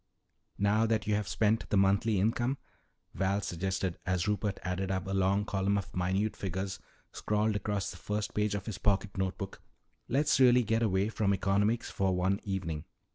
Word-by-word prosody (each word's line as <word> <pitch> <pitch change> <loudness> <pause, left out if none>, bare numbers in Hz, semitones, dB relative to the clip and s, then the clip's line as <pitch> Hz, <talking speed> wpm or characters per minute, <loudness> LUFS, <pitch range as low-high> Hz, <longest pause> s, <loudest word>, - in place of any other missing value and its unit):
"Now 105 +3 +3
that 110 -1 0
you 105 - +1
have 105 -1 0
spent 105 +4 +1
the 105 - +2
monthly 100 +2 +3
income," 120 +6 +1 0.6
Val 95 +1 +1
suggested 95 0 -2
as 90 0 0
Rupert 105 -1 0
added 90 +1 -2
up 95 0 -1
a 95 - -3
long 95 +1 +2
column 100 0 0
of 100 - -5
minute 95 +4 0
figures 95 0 -4 0.3
scrawled 105 0 0
across 105 -1 -2
the - - -10
first 105 +4 -3
page 105 -1 0
of 100 - -4
his 105 -3 -5
pocket 100 0 +1
note 95 -1 -1
book, 100 -2 -7 0.5
"let's 145 +3 +2
really 125 -1 +6
get 115 +1 +1
away 100 -2 +2
from 100 -3 +1
economics 105 +4 +1
for 95 -1 +1
one 95 +2 +1
evening. 90 -6 -3
100 Hz, 180 wpm, -31 LUFS, 95-105 Hz, 0.6 s, really